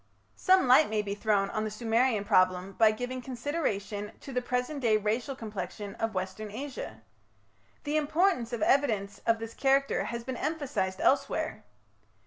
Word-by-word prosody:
Some 375 -6 +4
light 260 +5 +6
may 215 -1 0
be 200 -1 -3
thrown 205 -1 +1
on 215 - -1
the 215 - -2
Sumerian 225 0 +1
problem 185 -2 +3
by 220 +3 +5
giving 245 +4 -3
consideration 230 -6 -3
to 275 - -8
the 250 - 0
present 250 +4 -2
day 225 -4 +3
racial 225 +6 -1
complexion 205 -2 -6
of 225 -2 -2
Western 190 +3 -4
Asia. 220 - -7 0.8
The 295 +1 0
importance 310 -4 +1
of 235 -3 -2
evidence 215 -8 +1
of 230 0 +4
this 225 0 -7
character 275 0 +2
has 235 0 -4
been 255 0 -5
emphasized 255 -12 -2
elsewhere. 275 - +1
230 Hz, 155 wpm, -29 LUFS, 205-265 Hz, 0.8 s, light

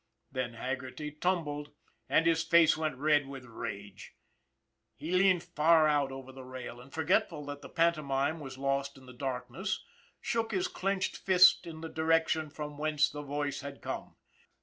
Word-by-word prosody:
Then 130 -3 -3
Haggerty 130 +4 -4
tumbled, 150 -3 -2 0.4
and 165 - +4
his 165 -1 +3
face 170 -2 +5
went 155 -4 -2
red 145 0 +3
with 135 -2 -8
rage. 100 -4 -7 0.8
He 160 - -6
leaned 185 -1 +4
far 165 -2 +4
out 145 -2 +2
over 135 0 -8
the 130 0 -10
rail, 125 -1 -8
and, 130 +2 -15
forgetful 150 -1 +1
that 145 0 -6
the - - -10
pantomime 155 -2 +1
was 135 -3 -8
lost 135 0 -1
in 130 - -15
the 125 - -12
darkness, 130 - -3 0.3
shook 230 -1 -1
his 185 -2 +1
clinched 195 +1 -1
fist 185 -2 +6
in 160 -1 -8
the 165 - -4
direction 160 -1 +1
from 150 -1 -7
whence 150 -1 +2
the 145 - -6
voice 145 -1 -3
had 140 -1 -8
come. - - -5
150 Hz, 165 wpm, -31 LUFS, 135-165 Hz, 0.8 s, fist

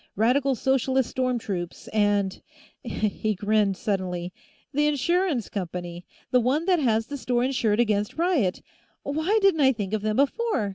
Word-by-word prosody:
"Radical 255 +6 +2
Socialist 265 0 +1
storm 255 -1 0
troops, 180 -6 -5
and 205 -2 +1 0.2
" - - -29
He 215 -2 -2
grinned 205 -1 +1
suddenly. 180 -3 -3 0.4
"The 295 +2 +2
insurance 300 - +1
company; 175 -2 -6 0.2
the 250 - +5
one 265 +7 +1
that 360 -2 +3
has 225 -5 +1
the 285 - -6
store 245 -2 0
insured 240 -5 +1
against 210 -1 +1
riot! 320 - +1 0.4
Why 315 +9 0
didn't 385 -6 +4
I 265 -1 +6
think 205 -3 -4
of 215 - 0
them 215 0 -1
before? 280 - +1
235 Hz, 155 wpm, -25 LUFS, 205-280 Hz, 0.4 s, I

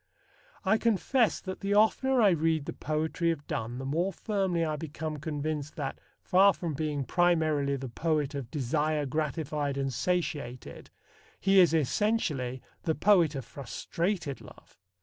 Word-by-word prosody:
I 220 - +3
confess 230 +2 +2
that 185 -1 -6
the 200 +1 0
oftener 240 +4 +4
I 200 - +6
read 160 -2 +1
the - - -5
poetry 160 +2 -1
of 160 -3 -2
Donne 115 +2 -3
the 130 - -5
more 170 +8 0
firmly 190 -5 -1
I 155 -1 -1
become 155 0 -5
convinced 150 0 -4
that, 140 -5 -4 0.2
far 195 +1 +5
from 170 -3 -3
being 145 -1 -2
primarily 155 -2 +2
the 135 -1 -5
poet 150 +3 -1
of 135 -5 -5
desire 150 +3 0
gratified 150 0 -2
and 135 -1 -1
satiated, 150 -5 -3 0.5
he 195 0 +4
is 175 -3 +6
essentially 145 - 0 0.2
the 160 - 0
poet 175 -7 +4
of 135 -4 -5
frustrated 165 - -3
love. - - -16
155 Hz, 150 wpm, -29 LUFS, 140-180 Hz, 0.5 s, I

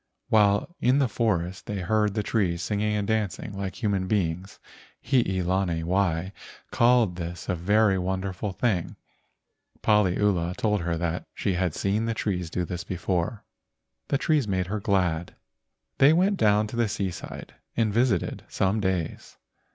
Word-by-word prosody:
While 105 - +3
in 125 +3 +3
the 140 -2 +3
forest 95 -6 -1
they 100 -2 -3
heard 105 +2 +1
the 105 - 0
trees 90 -6 0
singing 105 +2 0
and 100 -1 -1
dancing 105 -2 -2
like 95 +3 -5
human 100 -3 0
beings. 90 -1 -1 0.5
Hii 105 -8 +1
lani 90 -2 0
wai 90 0 0 0.4
called 120 -6 +3
this 85 0 -6
a - - 0
very 100 +3 +3
wonderful 95 +2 -2
thing. 95 -3 -1 0.9
Paliula 95 -4 +2
told 105 -3 +1
her 85 0 -1
that 85 +1 -3
she 95 - -1
had 90 -2 -1
seen 105 +3 0
the 115 0 -1
trees 90 -6 -2
do 90 +1 -2
this 85 -1 -5
before. 90 +3 -2 0.6
The 140 - +1
trees 150 -5 +1
made 95 -2 0
her 105 +4 -3
glad. 90 -6 0 0.6
They 140 +3 +7
went 190 +4 +2
down 105 - +3
to - - -7
the 120 -1 +2
seaside 95 -3 -5 0.2
and 110 -3 +2
visited 115 -6 +1
some 95 +3 0
days. 95 -5 -3
100 Hz, 150 wpm, -26 LUFS, 90-110 Hz, 0.9 s, They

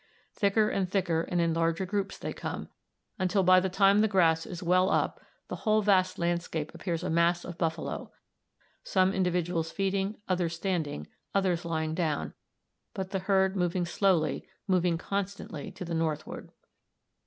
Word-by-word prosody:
Thicker 210 +1 +2
and 195 -3 -1
thicker 180 -4 +1
and 175 +1 -2
in 170 -1 +2
larger 165 +2 +1
groups 200 +1 -2
they - - -5
come, - - -5 0.5
until 190 +1 +2
by 185 0 +7
the 190 +1 -1
time 195 +2 +4
the 220 - +4
grass 165 -5 +3
is 180 0 -6
well 185 +2 +3
up - - 0 0.3
the - - -5
whole 215 0 +2
vast 185 -2 +3
landscape 170 -3 -2
appears 170 -2 -3
a 185 - -2
mass 170 +1 +2
of 175 -1 -8
buffalo, 160 -1 -2 0.7
some 185 0 +2
individuals 175 -3 0
feeding, 195 +1 -1
others 175 -3 0
standing, 165 - -2 0.3
others 180 -3 +1
lying 160 -1 -1
down, 160 -3 -1 0.6
but 190 0 -4
the 195 - 0
herd 190 0 +2
moving 180 -1 0
slowly, 170 -5 +1 0.2
moving 180 -3 +2
constantly 195 -4 -4
to 180 - -7
the 170 - -4
northward. 160 -2 -3
180 Hz, 155 wpm, -29 LUFS, 165-195 Hz, 0.7 s, by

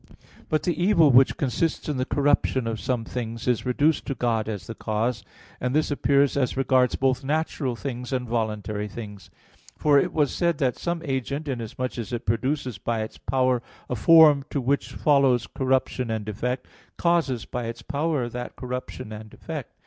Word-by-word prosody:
But 155 - +1
the 175 - +1
evil 170 -7 +5
which 130 +2 +5
consists 150 +4 -1
in 150 -3 -1
the 130 - 0
corruption 140 -3 +1
of 115 -1 -2
some 120 -3 -1
things 115 -1 -5
is 125 0 +1
reduced 145 +5 +2
to 135 - -2
God 115 -2 0
as 100 -5 -5
the 115 - -6
cause. 110 0 -2 0.4
And 125 +2 -1
this 155 0 +2
appears 140 -1 +3
as 135 -2 0
regards 130 -1 +3
both 135 0 +1
natural 145 -3 -1
things 125 0 -5
and 125 -2 -1
voluntary 105 -2 -2
things. 105 -4 -9 0.5
For 145 -2 +5
it - - 0
was 150 -3 +1
said 170 -1 +1
(A. 140 - +2
1) 125 - +3
that - - -19
some 170 -1 -2
agent 140 +2 -2
inasmuch 125 0 -4
as 115 - -5
it 120 -1 -4
produces 125 0 -1
by 115 +1 -1
its 110 - -9
power 130 +1 +1 0.3
a - - +1
form 155 +1 +7
to 140 - -1
which 135 +2 0
follows 135 -5 +3
corruption 130 -2 0
and 110 -2 -2
defect, 125 +5 -3 0.3
causes 165 -9 +1
by 120 -1 -4
its 115 +1 -6
power 150 -3 -1
that 120 +1 -6
corruption 125 -2 -6
and 110 0 -8
defect. - - -7
125 Hz, 185 wpm, -25 LUFS, 115-140 Hz, 0.5 s, form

